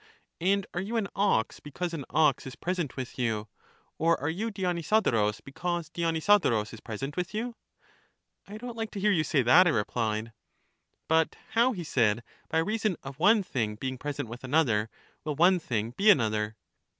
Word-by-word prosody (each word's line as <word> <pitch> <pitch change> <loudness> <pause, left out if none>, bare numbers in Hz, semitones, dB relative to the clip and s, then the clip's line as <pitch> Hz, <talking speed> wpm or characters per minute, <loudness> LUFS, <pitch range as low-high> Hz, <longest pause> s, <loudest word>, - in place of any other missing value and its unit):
And 195 +2 +2
are 175 - -1
you 220 +5 -2
an 215 -3 0
ox 195 - +1
because 170 +4 -5
an 145 -5 -4
ox 150 -2 +2
is 130 - -8
present 175 -5 -3
with 130 0 -6
you, 110 -3 -1 0.5
or 165 +1 +3
are 145 - -1
you 215 +7 -2
Dionysodorus, 175 - +1
because 170 +3 -3
Dionysodorus 165 - +2
is 115 - -9
present 135 +7 -5
with 180 +3 -3
you? 235 +2 -3 0.9
I 210 - -8
don't 240 +1 -7
like 225 -1 -3
to 200 - -4
hear 210 +2 +3
you 165 -6 +2
say 145 -4 +2
that, 165 +10 +7
I - - +5
replied. 110 -2 -1 0.7
But 160 0 +2 0.2
how, 240 +3 +3
he 180 -5 -5
said, 120 -6 +1 0.3
by - - 0
reason 210 +1 0
of 135 +1 -9
one 205 +4 +5
thing 110 - -2
being 130 +3 -4
pres 145 0 -5
ent - - -2
with 120 +3 -9
another, 125 -6 +2 0.3
will 150 -2 -3
one 180 +4 +5
thing 115 -7 -2
be 200 - +3
another? 110 - +3
160 Hz, 180 wpm, -28 LUFS, 120-190 Hz, 0.9 s, that